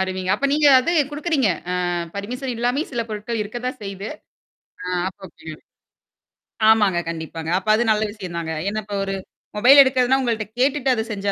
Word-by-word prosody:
அருமைங்க. 185 Hz, -1 st, -2 dB
அப்ப 280 Hz, +6 st, 0 dB
நீங்க 300 Hz, 0 st, +3 dB
அது 300 Hz, +7 st, -1 dB, 0.2 s
குடுக்குறீங்க. 295 Hz, -5 st, 0 dB, 0.2 s
அ -, -, 0 dB, 0.4 s
பர்மிஷன் 250 Hz, +6 st, -4 dB
இல்லாமே 245 Hz, +5 st, 0 dB
சில 235 Hz, -2 st, -1 dB
பொருட்கள் 215 Hz, +1 st, -4 dB
இருக்க 215 Hz, +3 st, -6 dB
தான் 255 Hz, 0 st, -4 dB
செய்து. 195 Hz, +1 st, -6 dB, 0.8 s
ஆ -, -, -7 dB, 0.2 s
அப்ப 190 Hz, +1 st, -8 dB
ஓகேங்க. 160 Hz, -1 st, -11 dB, 1.1 s
ஆமாங்க, 205 Hz, -5 st, +4 dB
கண்டிப்பாங்க. 160 Hz, 0 st, -6 dB
அப்ப 190 Hz, -, -6 dB
அது 230 Hz, -, +1 dB
நல்ல 215 Hz, 0 st, +1 dB
விஷயம் 185 Hz, -5 st, -8 dB
தாங்க. 160 Hz, -1 st, -3 dB, 0.2 s
ஏன்னா 215 Hz, +2 st, -3 dB
இப்ப 205 Hz, -1 st, -5 dB
ஒரு 195 Hz, -, -3 dB, 0.4 s
மொபைல் 255 Hz, +7 st, +7 dB
எடுக்கிறதுன்னா, 260 Hz, 0 st, +3 dB
உங்கள்ட்ட 230 Hz, -4 st, -1 dB
கேட்டுட்டு 270 Hz, 0 st, +1 dB
அது 220 Hz, -2 st, -1 dB
செஞ்சா 200 Hz, -1 st, -2 dB
215 Hz, 170 wpm, -21 LUFS, 195-255 Hz, 1.1 s, மொபைல்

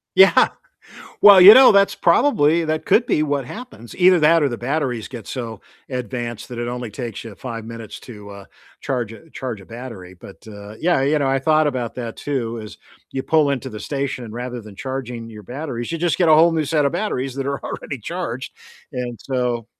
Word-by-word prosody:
Yeah. 190 Hz, +1 st, +6 dB, 0.7 s
Well, 200 Hz, -2 st, +9 dB
you 195 Hz, +4 st, +12 dB
know, 260 Hz, -1 st, +8 dB
that's 200 Hz, 0 st, +4 dB
probably 170 Hz, -, +3 dB
that 155 Hz, 0 st, -2 dB
could 240 Hz, +1 st, +3 dB
be 150 Hz, -, +1 dB
what 145 Hz, -3 st, -1 dB
happens. 220 Hz, -, -10 dB
Either 180 Hz, -1 st, +5 dB
that 160 Hz, +1 st, +4 dB
or 140 Hz, -, +3 dB
the 120 Hz, -, -4 dB
batteries 125 Hz, -3 st, -2 dB
get 120 Hz, -5 st, -9 dB
so 115 Hz, -5 st, -6 dB, 0.3 s
advanced 120 Hz, -2 st, -5 dB
that 120 Hz, -, -8 dB
it 120 Hz, 0 st, -3 dB
only 120 Hz, -2 st, -5 dB
takes 115 Hz, -1 st, -6 dB
you 110 Hz, -3 st, -9 dB
5 115 Hz, -2 st, -7 dB
minutes 115 Hz, -1 st, -9 dB
to, 105 Hz, -4 st, -11 dB
uh, 100 Hz, 0 st, -11 dB, 0.4 s
charge 120 Hz, -4 st, -3 dB
a 160 Hz, +8 st, -14 dB
charge 125 Hz, -6 st, -6 dB
a 95 Hz, -, -15 dB
battery, 115 Hz, -7 st, -9 dB
but, 95 Hz, +4 st, -15 dB
uh, 105 Hz, 0 st, -10 dB
yeah, 170 Hz, -5 st, +1 dB
you 150 Hz, +2 st, +2 dB
know, 140 Hz, -, 0 dB
I 135 Hz, 0 st, +1 dB
thought 155 Hz, +1 st, +3 dB
about 125 Hz, -5 st, -3 dB
that 120 Hz, -2 st, -6 dB
too, 120 Hz, -5 st, -3 dB
is 110 Hz, -1 st, -10 dB, 0.3 s
you 130 Hz, -, -3 dB
pull 155 Hz, -1 st, +2 dB
into 135 Hz, -1 st, -3 dB
the 105 Hz, -3 st, -8 dB
station 135 Hz, -1 st, -3 dB
and 110 Hz, -, -9 dB
rather 125 Hz, 0 st, -5 dB
than 105 Hz, -2 st, -13 dB
charging 125 Hz, -3 st, -6 dB
your 105 Hz, -2 st, -11 dB
batteries, 125 Hz, -, -6 dB
you 165 Hz, -, -3 dB
just 175 Hz, -1 st, 0 dB
get 175 Hz, -, +3 dB
a 155 Hz, -, +7 dB
whole 165 Hz, +2 st, +5 dB
new 160 Hz, -1 st, 0 dB
set 150 Hz, 0 st, +1 dB
of 140 Hz, -, +1 dB
batteries 135 Hz, -9 st, -2 dB
that 135 Hz, 0 st, -4 dB
are 140 Hz, 0 st, -3 dB
already 140 Hz, -, -6 dB
charged. 135 Hz, -, -5 dB, 0.4 s
And 125 Hz, -2 st, -5 dB
so 125 Hz, -3 st, -2 dB
130 Hz, 210 wpm, -20 LUFS, 115-155 Hz, 0.7 s, you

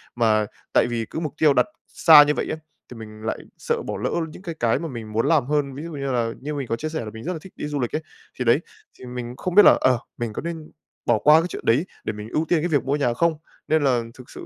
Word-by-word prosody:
Mà 110 Hz, -3 st, +3 dB, 0.3 s
tại -, -, +4 dB
vì 115 Hz, -1 st, -2 dB
cứ -, -, -4 dB
mục 155 Hz, -3 st, -4 dB
tiêu 150 Hz, -3 st, +5 dB
đặt 125 Hz, -2 st, +3 dB, 0.2 s
xa 155 Hz, -3 st, +8 dB
như 150 Hz, 0 st, +1 dB
vậy -, -, -2 dB
á, -, -, -2 dB, 0.3 s
thì 125 Hz, -, -9 dB
mình 110 Hz, -1 st, -10 dB
lại 110 Hz, -, -2 dB, 0.2 s
sợ -, -, -2 dB
bỏ -, -, -4 dB
lỡ -, -, -2 dB, 0.2 s
những 180 Hz, -, -12 dB
cái 170 Hz, -3 st, -6 dB
cái 115 Hz, -1 st, +2 dB
mà 165 Hz, -, -4 dB
mình 115 Hz, -5 st, -7 dB
muốn 115 Hz, +2 st, 0 dB
làm 155 Hz, -6 st, +3 dB
hơn. 145 Hz, -1 st, 0 dB
Ví 145 Hz, -, -6 dB
dụ 170 Hz, -, -7 dB
như 140 Hz, -3 st, -3 dB
là, 115 Hz, -2 st, 0 dB
như 150 Hz, +3 st, -4 dB
mình 140 Hz, -3 st, -4 dB
có 115 Hz, -, 0 dB
chia 155 Hz, +7 st, -4 dB
sẻ 160 Hz, 0 st, -3 dB
là 105 Hz, -, -5 dB
mình 110 Hz, -, -9 dB
rất 180 Hz, +3 st, -2 dB
là 160 Hz, -, -6 dB
thích 190 Hz, -, -14 dB
đi -, -, -5 dB
du 145 Hz, -1 st, -3 dB
lịch 120 Hz, +3 st, -2 dB
ấy, 155 Hz, -, -1 dB, 0.4 s
thì 125 Hz, -, -1 dB
đấy, 120 Hz, +6 st, +5 dB, 0.4 s
thì -, -, -10 dB
mình 125 Hz, -1 st, -6 dB
không 180 Hz, -1 st, -3 dB
biết 210 Hz, -, +9 dB
là, -, -, +8 dB
ờ, 125 Hz, -3 st, +3 dB, 0.2 s
mình 115 Hz, -3 st, -3 dB
có -, -, -4 dB
nên 165 Hz, -2 st, -6 dB, 0.3 s
bỏ 120 Hz, -2 st, +3 dB
qua 150 Hz, +7 st, +6 dB
cái 170 Hz, -, -3 dB
chuyện -, -, -8 dB
đấy 135 Hz, +10 st, +3 dB, 0.2 s
để -, -, -3 dB
mình 105 Hz, +1 st, -8 dB
ưu 155 Hz, +6 st, 0 dB
tiên 165 Hz, 0 st, +2 dB
cái 175 Hz, -, 0 dB
việc 150 Hz, -5 st, +1 dB
mua 140 Hz, +2 st, +1 dB
nhà 130 Hz, -5 st, +1 dB
không? 165 Hz, +7 st, +2 dB, 0.3 s
Nên 155 Hz, -1 st, +2 dB
là 125 Hz, -3 st, +3 dB
thực 125 Hz, 0 st, -14 dB
sự -, -, -10 dB
140 Hz, 300 wpm, -23 LUFS, 120-155 Hz, 0.4 s, biết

